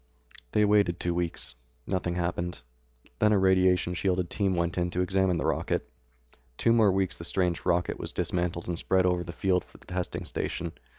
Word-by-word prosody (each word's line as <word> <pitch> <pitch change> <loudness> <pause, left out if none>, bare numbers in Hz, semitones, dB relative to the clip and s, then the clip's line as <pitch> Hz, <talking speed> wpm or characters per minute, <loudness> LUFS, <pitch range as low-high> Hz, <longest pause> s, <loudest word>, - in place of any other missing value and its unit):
They 105 - +4
waited 100 -4 +3
two 85 - -1
weeks. 85 -5 -3 0.3
Nothing 90 -2 -1
happened. 90 0 -2 0.6
Then 105 - +4
a 105 - +4
radiation 95 -2 +3
shielded 90 -1 0
team 95 -3 +1
went 85 0 0
in 90 0 0
to 90 +1 -1
examine 95 -1 +2
the - - -2
rocket. - - -1 0.7
Two 115 - +3
more 110 -4 +5
weeks 95 -1 0
and - - -10
the 85 - -5
strange 90 -1 0
rocket 90 0 +1
was - - -5
dismantled 85 -1 -1
and 85 -1 -1
spread 95 -1 +2
over 90 -1 +1
the 85 - -7
field 90 0 +1
of - - -14
the - - -18
testing 90 0 -3
station. - - -3
90 Hz, 190 wpm, -28 LUFS, 85-95 Hz, 0.7 s, more